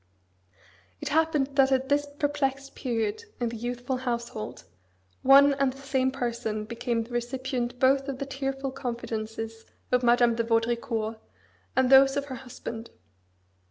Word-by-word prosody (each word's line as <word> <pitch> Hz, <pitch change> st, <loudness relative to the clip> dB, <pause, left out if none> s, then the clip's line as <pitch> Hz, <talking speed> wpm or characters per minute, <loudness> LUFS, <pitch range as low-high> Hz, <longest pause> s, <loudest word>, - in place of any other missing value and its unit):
It -, -, -4 dB
happened 310 Hz, -3 st, +2 dB
that 270 Hz, 0 st, +5 dB
at 265 Hz, 0 st, +2 dB
this 290 Hz, +1 st, +2 dB
perplexed 285 Hz, -2 st, -2 dB
period 230 Hz, -, -2 dB
in 240 Hz, -1 st, 0 dB
the 230 Hz, -, -6 dB
youthful 245 Hz, +3 st, -3 dB
household, 235 Hz, -3 st, -4 dB, 0.6 s
one 280 Hz, +1 st, +7 dB
and 275 Hz, -1 st, +1 dB
the 265 Hz, -, -13 dB
same 265 Hz, -1 st, 0 dB
person 235 Hz, -4 st, -3 dB
became 235 Hz, +1 st, -2 dB
the 230 Hz, -, -14 dB
recipient 245 Hz, 0 st, -2 dB
both 270 Hz, +2 st, +3 dB
of 275 Hz, -2 st, -3 dB
the 275 Hz, -, -3 dB
tearful 270 Hz, 0 st, -3 dB
confidences 225 Hz, -3 st, -5 dB, 0.3 s
of 250 Hz, -1 st, +4 dB
Madame 240 Hz, -1 st, +4 dB
de 230 Hz, 0 st, 0 dB
Vaudricourt 225 Hz, -1 st, 0 dB, 0.6 s
and 260 Hz, 0 st, +3 dB
those 270 Hz, +1 st, +7 dB
of 280 Hz, -, -1 dB
her 265 Hz, -2 st, -6 dB
husband. 230 Hz, -2 st, -7 dB
255 Hz, 145 wpm, -27 LUFS, 235-270 Hz, 0.6 s, one